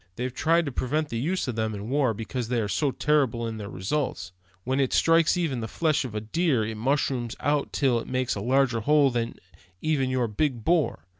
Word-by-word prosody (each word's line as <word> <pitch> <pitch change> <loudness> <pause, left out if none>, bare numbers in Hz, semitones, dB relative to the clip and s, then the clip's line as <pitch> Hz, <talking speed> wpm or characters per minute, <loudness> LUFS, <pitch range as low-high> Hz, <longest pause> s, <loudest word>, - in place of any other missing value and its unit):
They've 125 +1 -3
tried 165 +4 +2
to 140 - -3
prevent 145 +5 -1
the 115 - -3
use 175 +7 -1
of 125 - -3
them 110 -1 -1
in 100 +1 -6
war, 130 -3 +1
because 115 +2 -4
they 120 0 0
are 105 - -1
so 145 +8 0
terrible 135 -5 +1
in 115 -1 -4
their 100 -1 -6
results. 125 - -3 0.3
When 130 +2 -1
it 135 -2 +1
strikes 165 +1 +4
even 155 -8 -1
the 110 - -4
flesh 155 +3 0
of 115 -4 -7
a 105 - -2
deer, 130 0 +1
it 110 - -4
mushrooms 130 -1 0
out 145 -1 0
till 130 -4 +2
it - - -8
makes 130 0 -1
a 100 - -4
larger 125 0 +2
hole 145 +4 +4
even 120 -1 -2 0.7
than 130 - 0
your 130 -2 0
big 120 +2 -1
bore. 160 - +1
130 Hz, 220 wpm, -26 LUFS, 115-150 Hz, 0.7 s, strikes